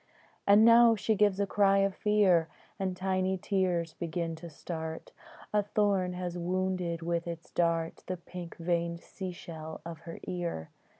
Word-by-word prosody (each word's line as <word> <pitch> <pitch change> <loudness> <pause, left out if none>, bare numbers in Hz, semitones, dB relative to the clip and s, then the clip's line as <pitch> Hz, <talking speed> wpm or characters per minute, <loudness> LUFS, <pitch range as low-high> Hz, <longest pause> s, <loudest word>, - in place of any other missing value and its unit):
And 205 +2 +7
now 230 0 +8
she 220 +1 +1
gives 205 -2 +3
a 200 - +3
cry 195 0 +3
of 195 0 +2
fear, 190 -6 +3 0.3
And 190 -1 -2
tiny 190 0 0
tears 180 -4 0
begin 165 -1 -3
to 170 +1 -9
start: 160 +1 -6 0.4
A 210 - +4
thorn 200 -3 +1
has 180 -1 -4
wounded 180 -1 -1
with 170 0 -1
its 170 -1 -7
dart 165 -1 0
The 185 - -2
pink 175 0 -9
veined 170 0 -1
sea 190 -2 -6
shell 160 -2 -8
of 165 -2 -7
her 165 0 -9
ear. 170 - -4
180 Hz, 160 wpm, -30 LUFS, 170-195 Hz, 0.4 s, now